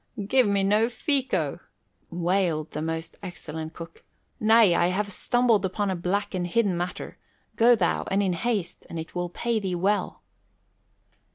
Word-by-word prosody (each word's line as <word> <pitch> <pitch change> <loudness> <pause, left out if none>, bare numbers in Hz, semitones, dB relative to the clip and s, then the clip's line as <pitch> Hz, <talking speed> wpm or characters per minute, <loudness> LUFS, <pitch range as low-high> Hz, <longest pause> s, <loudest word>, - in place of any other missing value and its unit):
"Give 255 +2 +3
me 200 -1 +2
no 210 +4 +3
fico," 245 - 0 0.5
wailed 170 -3 0
the 150 - -4
most 165 +1 -4
excellent 160 -4 -7
cook. 165 -1 -10 0.4
"Nay, 220 -3 +5
I 170 0 +3
have 200 +3 -1
stumbled 235 0 +2
upon 195 +1 -1
a - - -1
black 200 +4 -2
and 180 -1 -2
hidden 200 0 +1
matter. 175 +1 -5 0.4
Go 240 +1 +6
thou, - - 0
and 200 +1 +1
in 185 -2 +1
haste, 200 0 -3
and 170 - -6
it 160 0 -7
will 175 0 -2
pay 230 +5 -1
thee 190 -3 -2
well." 200 +4 -1
190 Hz, 160 wpm, -26 LUFS, 170-215 Hz, 0.5 s, Go